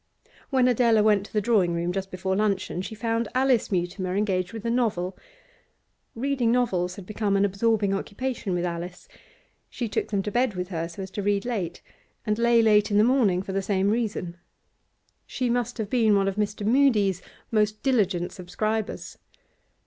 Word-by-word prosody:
When 260 -3 +3
Adela 235 -3 +4
went 210 -2 +3
to - - -23
the 210 - +2
drawing 195 -6 +2
room 170 +1 -1
just 195 +1 -3
before 190 +1 -2
luncheon, 200 -3 0
she 210 +3 -6
found 230 +1 -1
Alice 260 -4 +2
Mutimer 180 0 -1
engaged 190 -3 0
with 225 0 -8
a 230 - +1
novel. 210 -7 0 1.0
Reading 255 -1 0
novels 185 -8 0
had 195 - -10
become 205 0 0
an 200 - +3
absorbing 205 0 +1
occupation 200 0 -3
with 175 0 -1
Alice. 175 +1 -5 0.6
She 240 - -4
took - - -2
them 200 -2 -1
to 210 - -3
bed 245 -3 +1
with 180 0 -4
her 165 -3 -3
so 185 +3 -7
as 190 - -8
to 205 - -4
read 200 +1 0
late, 190 -8 -3 0.4
and 210 0 0
lay 235 -1 +4
late 210 -1 +4
in 205 - +2
the 210 - +6
morning 220 -7 +3
for 195 -1 -6
the 195 - 0
same 195 0 +1
reason. 210 -6 -2 0.9
She 250 -2 -1
must 245 -1 -1
have 215 -3 -4
been 225 -4 +4
one 195 0 +2
of 195 - -1
Mr. 210 0 -2
Mudie's 215 -7 +3 0.3
most 210 -1 +1
diligent 195 -9 +1
subscribers. 215 +4 -4
210 Hz, 180 wpm, -25 LUFS, 190-230 Hz, 1.0 s, the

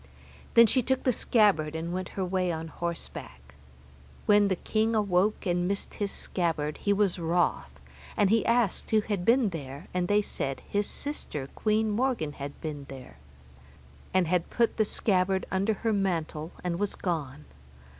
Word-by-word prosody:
Then 230 - +9
she 255 +3 +3
took 260 +2 0
the 255 - +3
scabbard 195 -11 +3
and 165 +2 -3
went 185 0 -3
her 190 - 0
way 180 -1 0
on 160 0 -4
horseback. 160 - -6 0.7
When 205 -1 +5
the 190 - +1
king 220 +5 0
awoke 205 0 +1
and 175 -1 +1
missed 200 +1 -3
his 205 -1 -2
scabbard, 160 -4 -2
he 205 - 0
was 200 -3 +2
wroth, 165 - 0 0.4
and 205 -1 +3
he 225 0 +4
asked 235 -4 +1
who 215 -1 +4
had 205 -4 -2
been 235 +1 +4
there, 140 -4 -7
and 180 -1 0
they 205 +1 +3
said 135 -7 -4
his 205 0 0
sister, 150 - -4
Queen 215 0 +1
Morgan 230 - 0
had 140 0 -7
been 145 -3 -5
there, 130 -2 -10 0.9
and 185 -1 +3
had 175 0 0
put 235 -1 +1
the 215 - +3
scabbard 190 -2 +1
under 195 +3 +1
her 225 - +3
mantle 170 -5 -1
and 175 -1 -2
was 205 -1 -1
gone. 150 -5 -3
185 Hz, 165 wpm, -28 LUFS, 160-210 Hz, 0.9 s, Then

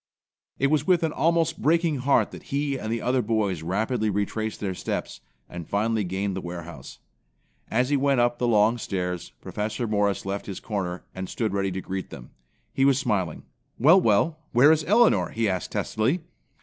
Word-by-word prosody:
It 140 +1 +1
was 150 -1 +1
with 180 -2 +3
an 160 - +1
almost 165 +2 +1
breaking 165 -1 +2
heart 135 +2 +2
that - - -9
he 140 0 -1
and 110 -4 -4
the 115 -1 -2
other 125 +1 +2
boys 105 -6 -1
rapidly 110 +6 -1
retraced 105 +2 -2
their 95 -3 -2
steps - - -4 0.3
and 85 -2 -8
finally 110 +1 +1
gained 95 +1 -2
the 95 - -3
warehouse. 85 -5 -8 0.7
As 125 +3 +1
he 145 - +4
went 140 -1 +2
up 120 0 +2
the 125 - +1
long 110 +1 +3
stairs, 90 -4 -3
Professor 110 +3 -3
Morris 105 -2 0
left 100 +1 -4
his 100 - -5
corner, 95 -4 -4
and 95 -1 -6
stood 110 -4 -2
ready 100 -1 0
to 95 - -4
greet 95 0 -5
them. - - -11 0.4
He 135 - +1
was 135 -1 +4
smiling. 95 - -1 0.3
"Well, 170 +9 +6
well, 135 - +2
where 130 +6 +7
is 160 -1 +2
Elinor?" 225 +4 +4
he 115 -1 -1
asked 95 -2 -2
testily. 125 +11 0
110 Hz, 185 wpm, -25 LUFS, 95-135 Hz, 0.7 s, where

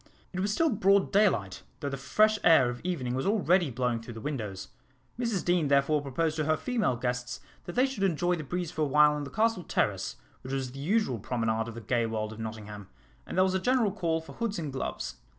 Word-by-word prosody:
It 185 - -3
was 200 +2 0
still 325 +8 +2
broad 195 -2 +3
daylight, 185 - +2 0.2
though 145 - -3
the 135 - -3
fresh 215 +10 +2
air 130 -7 +6
of 120 - -8
evening 145 -9 -2
was 130 +6 -1
already 185 -5 +3
blowing 120 -1 -1
through 115 0 -9
the - - -6
windows. 110 -8 -5 0.5
Mrs 230 -7 -1
Deane 175 -3 +2
therefore 140 +2 +3
proposed 155 +3 -1
to 155 - 0
her 155 +1 +2
female 225 - 0
guests 125 +1 -3 0.3
that 175 - -6
they 255 - +4
should 265 -6 -4
enjoy 175 -2 +2
the 160 - -5
breeze 175 +3 -3
for 160 - -4
a - - +4
while 150 +1 +5
on 150 -1 -3
the - - -7
Castle 225 -4 +1
Terrace, 95 - -1 0.3
which 130 - -6
was 130 -2 -2
the 135 - -9
usual 170 - +1
promenade 115 0 -1
of 115 - -7
the 115 - -7
gay 115 +1 0
world 110 -1 -3
of 110 - -11
Nottingham, 105 -3 -7 0.4
and - - -5
there 185 - +6
was 190 0 +1
a 190 - +1
general 245 0 +2
call 165 -5 -1
for 160 - -12
hoods 225 -3 -2
and 150 -5 -4
gloves. 135 - -4
150 Hz, 230 wpm, -29 LUFS, 125-190 Hz, 0.5 s, air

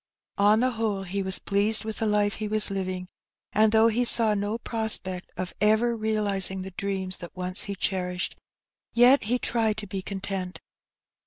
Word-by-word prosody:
On 210 +2 +5
the 255 0 +2
whole 220 -4 -2
he 195 +2 -3
was 190 -1 +1
pleased 210 +2 +1
with 220 -1 -4
the 225 - 0
life 205 -1 +1
he 215 - -3
was 215 -1 0
living, 185 -2 -3 0.5
and 215 0 +4
though 220 +1 +5
he 230 +2 +1
saw 230 -2 +3
no 205 +2 -1
prospect 220 -6 -1
of 180 -1 -4
ever 220 +3 +3
realizing 205 -4 -1
the 190 - -8
dreams 190 -1 -3
that 175 - -10
once 180 +1 0
he 200 - -4
cherished, 180 -1 -2 0.6
yet 245 +3 +6
he 245 +4 +1
tried 225 -3 0
to 215 - -5
be 195 -1 -5
content. 190 -1 -4
205 Hz, 175 wpm, -26 LUFS, 190-220 Hz, 0.6 s, yet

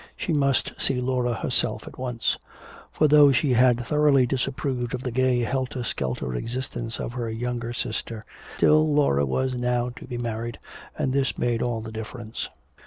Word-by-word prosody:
She 170 - -1
must 140 -3 +2
see 130 -2 +1
Laura 125 -1 0
herself - - -1
at - - -11
once. 125 -3 0 0.6
For 155 - +3
though 145 -1 +7
she 135 +1 +2
had 125 0 +4
thoroughly 145 -2 +4
disapproved 130 -1 -2
of 125 - -6
the 125 - -2
gay 130 0 +2
helter 130 +1 -2
skelter 65 - -2
existence 120 - -4
of 120 - -4
her 120 -2 -3
youngest 120 +1 -3
sister, 110 -2 -5 0.3
still 155 0 +4
Laura 105 - +3
was 130 - 0
now 125 0 0
to 125 - -10
be 125 -2 -4
married, 115 0 -3 0.4
and 130 - 0
this 135 -1 0
made 120 -1 0
all 120 -2 -1
the 110 0 -7
difference. 110 0 -6
125 Hz, 170 wpm, -25 LUFS, 115-130 Hz, 0.6 s, though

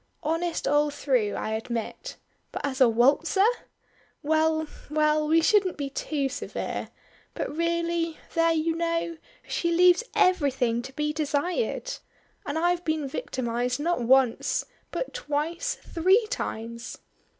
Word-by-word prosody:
"Honest 330 +2 -1
all 295 +1 +3
through, 260 -7 0
I 215 - -3
admit; 225 +1 -4 0.3
but - - -4
as 270 -1 -3
a 250 - +7
waltzer! 280 - +3 0.8
Well, 315 +1 +2 0.2
well, 305 0 +2
we 325 +1 +4
shouldn't 390 -1 +3
be 280 -2 -4
too 280 0 -1
severe 280 +1 -4 0.5
but - - -3
really, 335 0 0 0.2
there 330 0 +3
you 325 0 +1
know, 335 0 -1 0.3
she 340 - -1
leaves 360 +5 +5
everything 270 -10 +2
to 265 +2 -9
be 300 +2 -1
desired. 350 - -1 0.5
And 285 - -2
I've 350 +1 +1
been 315 -3 -1
victimized 250 -1 -2
not 335 -2 0
once, 250 0 +3 0.2
but - - -4
twice 340 +3 -2
three 380 +7 +2
times." 235 - -4
310 Hz, 130 wpm, -26 LUFS, 270-335 Hz, 0.8 s, a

